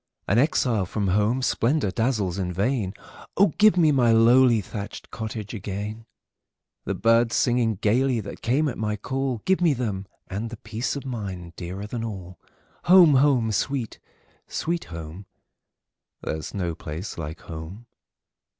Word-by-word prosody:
An 105 Hz, -, +3 dB
exile 120 Hz, -, +2 dB
from 100 Hz, 0 st, -1 dB
home, 105 Hz, +7 st, +1 dB
splendor 125 Hz, -3 st, +1 dB
dazzles 110 Hz, -6 st, 0 dB
in 90 Hz, -2 st, -2 dB
vain:O, 105 Hz, -, -1 dB
give 215 Hz, -3 st, +6 dB
me 160 Hz, -3 st, +5 dB
my 125 Hz, -4 st, +4 dB
lowly 120 Hz, +1 st, +5 dB
thatched 100 Hz, +1 st, -7 dB
cottage 110 Hz, -1 st, -5 dB
again! 105 Hz, +2 st, -5 dB, 0.8 s
The -, -, -2 dB
birds 115 Hz, +2 st, +3 dB
singing 120 Hz, -3 st, +2 dB
gayly 120 Hz, +5 st, +1 dB
that 100 Hz, -2 st, -8 dB
came 135 Hz, +7 st, +1 dB
at 130 Hz, -, -4 dB
my 105 Hz, -1 st, -1 dB
call;—Give 135 Hz, -, -1 dB
me 165 Hz, -5 st, +4 dB
them,—and 105 Hz, -1 st, -5 dB
the 115 Hz, -, -8 dB
peace 110 Hz, +5 st, -3 dB
of 140 Hz, -, -6 dB
mind 95 Hz, -9 st, -6 dB
dearer 95 Hz, +3 st, -6 dB
than 115 Hz, +2 st, -4 dB
all! 95 Hz, -5 st, -7 dB, 0.5 s
Home! 175 Hz, -4 st, +8 dB
home! 130 Hz, -5 st, +3 dB
sweet, 125 Hz, +3 st, -2 dB, 0.5 s
sweet 170 Hz, +1 st, -2 dB
home! 85 Hz, +4 st, -8 dB, 1.0 s
There 80 Hz, -, -3 dB
's -, -, -8 dB
no 90 Hz, -4 st, -1 dB
place 80 Hz, +4 st, -7 dB
like 80 Hz, 0 st, -6 dB
home! 85 Hz, +8 st, -8 dB
110 Hz, 140 wpm, -25 LUFS, 95-130 Hz, 1.0 s, Home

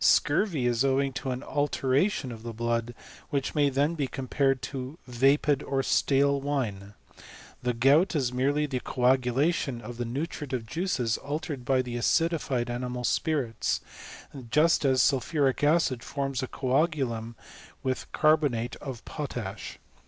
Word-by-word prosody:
Scurvy 165 Hz, -, +3 dB
is 120 Hz, 0 st, +2 dB
owing 135 Hz, 0 st, +1 dB
to 135 Hz, 0 st, -4 dB
an 125 Hz, +1 st, -3 dB
alteration 145 Hz, +1 st, 0 dB
of 115 Hz, -2 st, -8 dB
the 115 Hz, 0 st, -6 dB
blood, 115 Hz, +1 st, -2 dB, 0.3 s
which 140 Hz, -3 st, -1 dB
may 145 Hz, -2 st, +3 dB
then 140 Hz, +4 st, +1 dB
be 145 Hz, -5 st, -1 dB
compared 135 Hz, 0 st, 0 dB
to 130 Hz, +3 st, -5 dB
vapid 135 Hz, +3 st, +2 dB
or 135 Hz, -1 st, -1 dB
stale 140 Hz, +1 st, +2 dB
wine. 105 Hz, -8 st, -3 dB, 0.7 s
The 125 Hz, -1 st, -1 dB
gout 145 Hz, +10 st, +4 dB
is 130 Hz, -4 st, 0 dB
merely 140 Hz, +4 st, +1 dB
the 135 Hz, -3 st, -2 dB
coagulation 130 Hz, +3 st, +1 dB
of 120 Hz, 0 st, -8 dB
the 120 Hz, -, -2 dB
nutritive 135 Hz, -1 st, -4 dB
juices 125 Hz, -, -1 dB
altered 145 Hz, -3 st, -4 dB
by 130 Hz, 0 st, +2 dB
the 120 Hz, -1 st, -5 dB
acidified 140 Hz, -3 st, +1 dB
animal 125 Hz, 0 st, -4 dB
spirits; 135 Hz, -3 st, 0 dB, 0.7 s
just 150 Hz, +3 st, +3 dB
as 130 Hz, -1 st, +4 dB
sulphuric 135 Hz, +1 st, +1 dB
acid 145 Hz, -5 st, +3 dB
forms 135 Hz, -2 st, -3 dB
a 130 Hz, -, -3 dB
coagulum 130 Hz, -5 st, -1 dB, 0.5 s
with 130 Hz, -1 st, -3 dB
carbonate 145 Hz, -7 st, +2 dB
of 130 Hz, -4 st, -8 dB
potash. 120 Hz, -9 st, -5 dB
135 Hz, 135 wpm, -28 LUFS, 125-145 Hz, 0.7 s, gout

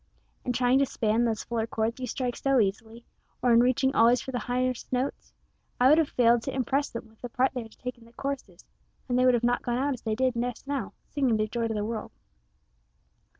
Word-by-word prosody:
In 250 Hz, -, -1 dB
trying 250 Hz, +2 st, +3 dB
to 275 Hz, -, +4 dB
span 225 Hz, +1 st, +1 dB
those 225 Hz, -2 st, -1 dB
fuller 230 Hz, -1 st, -2 dB
chords 225 Hz, +2 st, -2 dB
you 255 Hz, -, -3 dB
strike 250 Hz, 0 st, -2 dB
so 275 Hz, -1 st, +2 dB
easily, 220 Hz, +3 st, -2 dB, 0.4 s
or 245 Hz, -2 st, +4 dB
in 230 Hz, -, +7 dB
reaching 255 Hz, +2 st, +3 dB
always 235 Hz, +2 st, +5 dB
for 265 Hz, -, -6 dB
the 245 Hz, -, -2 dB
highest 250 Hz, 0 st, -2 dB
notes, 255 Hz, +2 st, -2 dB, 0.5 s
I 250 Hz, +1 st, +6 dB
would 305 Hz, +3 st, +6 dB
have 315 Hz, -, +1 dB
failed 240 Hz, -1 st, +4 dB
to 270 Hz, -, -5 dB
impress 270 Hz, +2 st, 0 dB
them 230 Hz, -1 st, -7 dB
with 220 Hz, 0 st, -25 dB
the 245 Hz, -, -5 dB
part 255 Hz, +3 st, +1 dB
they 250 Hz, -, -3 dB
are 225 Hz, -, -9 dB
to -, -, -21 dB
take 250 Hz, -1 st, -6 dB
in 230 Hz, -, -17 dB
the 230 Hz, -, -19 dB
choruses, 255 Hz, -10 st, -5 dB, 0.4 s
and 250 Hz, -1 st, +1 dB
they 255 Hz, -, +4 dB
would 240 Hz, -2 st, +3 dB
not 240 Hz, 0 st, +2 dB
have -, -, -33 dB
gone 240 Hz, 0 st, -1 dB
out 280 Hz, +2 st, 0 dB
as 250 Hz, -, -8 dB
they 220 Hz, -1 st, -1 dB
did 255 Hz, +1 st, +1 dB
just 240 Hz, +1 st, -3 dB
now, 280 Hz, 0 st, -3 dB
singing 265 Hz, -6 st, +1 dB
their 215 Hz, -, +1 dB
joy 230 Hz, +1 st, -2 dB
to 225 Hz, -, -2 dB
the 210 Hz, 0 st, -1 dB
world." 225 Hz, 0 st, -4 dB
245 Hz, 240 wpm, -27 LUFS, 230-260 Hz, 0.5 s, in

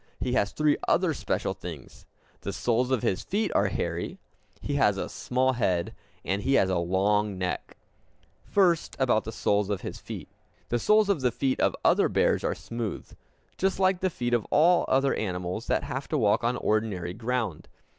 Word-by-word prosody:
He 125 Hz, -, -1 dB
has 100 Hz, -5 st, +1 dB
three 150 Hz, -1 st, +2 dB
other -, -, +2 dB
special -, -, -2 dB
things: -, -, -10 dB, 0.3 s
the -, -, -4 dB
soles 120 Hz, +1 st, 0 dB
of 130 Hz, -4 st, 0 dB
his 95 Hz, -, 0 dB
feet 215 Hz, +3 st, -1 dB
are 100 Hz, -, +3 dB
hairy; 85 Hz, -2 st, -3 dB, 0.4 s
he 145 Hz, -, -4 dB
has 105 Hz, -8 st, +3 dB
a -, -, -2 dB
small 130 Hz, +1 st, 0 dB
head; 90 Hz, -8 st, 0 dB, 0.3 s
and 100 Hz, +1 st, -1 dB
he 135 Hz, +5 st, +2 dB
has 95 Hz, -6 st, +3 dB
a 90 Hz, -, +1 dB
long 100 Hz, +3 st, +1 dB
neck. 90 Hz, -1 st, -4 dB, 0.7 s
First, 180 Hz, -5 st, +2 dB
about 125 Hz, -5 st, +2 dB
the 110 Hz, -, -4 dB
soles 105 Hz, -2 st, 0 dB
of 100 Hz, -3 st, -2 dB
his -, -, -6 dB
feet. -, -, -8 dB, 0.4 s
The 120 Hz, -, +1 dB
soles 215 Hz, -, +4 dB
of 195 Hz, -8 st, +1 dB
the 125 Hz, -1 st, +2 dB
feet 130 Hz, +1 st, -1 dB
of -, -, +2 dB
other -, -, +4 dB
bears -, -, +2 dB
are -, -, 0 dB
smooth, 110 Hz, +5 st, -5 dB, 0.5 s
just 190 Hz, 0 st, +1 dB
like 190 Hz, -1 st, +3 dB
the 185 Hz, -, +1 dB
feet 120 Hz, -7 st, -3 dB
of 120 Hz, -3 st, +1 dB
all 170 Hz, +4 st, +4 dB
other 135 Hz, +1 st, +2 dB
animals 90 Hz, +2 st, -3 dB
that -, -, +1 dB
have 135 Hz, +2 st, -4 dB
to 155 Hz, -, -1 dB
walk 110 Hz, -1 st, +2 dB
on 120 Hz, +1 st, +1 dB
ordinary 105 Hz, -6 st, -1 dB
ground. 115 Hz, -6 st, -3 dB
115 Hz, 185 wpm, -27 LUFS, 100-135 Hz, 0.7 s, soles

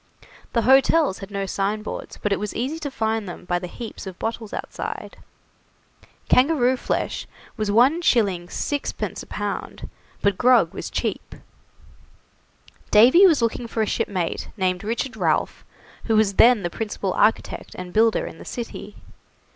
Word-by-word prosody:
The 230 Hz, -, +2 dB
hotels 270 Hz, 0 st, +4 dB
had 195 Hz, -, -8 dB
no 200 Hz, -1 st, -3 dB
signboards, 205 Hz, +3 st, -3 dB
but 210 Hz, -, +1 dB
it -, -, -1 dB
was 210 Hz, 0 st, -4 dB
easy 275 Hz, +7 st, -2 dB
to 295 Hz, -3 st, -4 dB
find 220 Hz, -5 st, -2 dB
them 175 Hz, -, -9 dB
by 175 Hz, 0 st, 0 dB
the 180 Hz, -, -6 dB
heaps 225 Hz, +1 st, -8 dB
of 185 Hz, -1 st, -8 dB
bottles 225 Hz, -1 st, -4 dB
outside. -, -, -6 dB, 1.1 s
Kangaroo 260 Hz, -2 st, +4 dB
flesh -, -, -3 dB, 0.3 s
was 215 Hz, -3 st, -2 dB
1s. 250 Hz, +10 st, +4 dB
6d. 210 Hz, -, -1 dB
a -, -, -10 dB
pound, -, -, -5 dB, 0.4 s
but 200 Hz, -2 st, +2 dB
grog 250 Hz, 0 st, +4 dB
was -, -, -6 dB
cheap. -, -, -3 dB, 1.5 s
Davy 255 Hz, -, +7 dB
was 305 Hz, -9 st, +3 dB
looking 230 Hz, +1 st, -1 dB
for 225 Hz, -1 st, -1 dB
a -, -, +1 dB
shipmate 185 Hz, -4 st, -2 dB
named 185 Hz, -2 st, 0 dB
Richard 235 Hz, +4 st, -3 dB
Ralph, -, -, 0 dB, 0.4 s
who 225 Hz, -, +1 dB
was 215 Hz, -2 st, +3 dB
then 230 Hz, 0 st, +5 dB
the 175 Hz, -, -2 dB
principal 205 Hz, -3 st, -3 dB
architect 225 Hz, -, 0 dB
and 180 Hz, -1 st, -8 dB
builder 225 Hz, +1 st, +3 dB
in -, -, -9 dB
the -, -, -9 dB
city. 230 Hz, -3 st, -7 dB
220 Hz, 150 wpm, -23 LUFS, 195-250 Hz, 1.5 s, Davy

